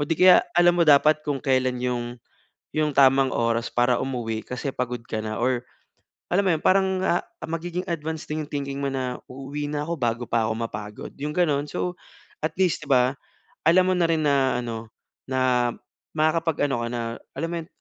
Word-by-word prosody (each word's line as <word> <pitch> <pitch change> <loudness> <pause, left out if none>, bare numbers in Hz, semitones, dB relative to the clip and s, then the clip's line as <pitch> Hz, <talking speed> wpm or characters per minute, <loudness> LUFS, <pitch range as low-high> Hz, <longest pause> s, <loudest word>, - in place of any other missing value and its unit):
di 165 - 0
kaya 185 0 +8 0.2
alam 175 0 +6
mo - - +6
dapat 150 +1 +5
kung 145 -2 -1
kailan 130 -2 +1
'yong 120 -1 -2 0.6
yung 155 -1 +1
tamang 135 0 +5
oras 115 0 +1
para 120 0 +3
umuwi 115 -4 -3
kasi 125 +2 -3
pagod 125 -2 -3
ka 110 - -3
na 110 0 -4
or 125 -1 +1 0.7
alam 200 +2 +3
mo - - +4
'yon 155 - -6
parang, 190 0 +4 0.2
ah, 175 - +1 0.2
magiging 170 +2 -4
advanced 160 -1 -4
din 155 0 -2
thinking 140 -1 -4
mo 140 - 0
na, 130 -2 -2
"Uuwi 140 +3 -5
na 150 0 -2
ako 170 - -1
bago 120 0 0
pa 115 -1 +2
ako - - 0
mapagod," 105 -2 -6
'yong 150 +2 -4
ganoon 150 -5 +2
so 180 +4 -3 0.5
at 155 - +1
least 180 -4 +2
'di - - -13
ba? 125 -1 +6 0.6
Alam 185 +2 +5
mo - - 0
na 170 - +3
rin 160 -2 +1
na 135 -3 +2
ano 115 -1 -5 0.4
na 125 -2 +2 0.4
makakapag-ano 155 -5 +1
ka - - -3
na, 120 - -2 0.3
alam 165 +4 -2
mo 170 - -2
'yon 160 - -18
140 Hz, 190 wpm, -24 LUFS, 125-155 Hz, 0.7 s, kaya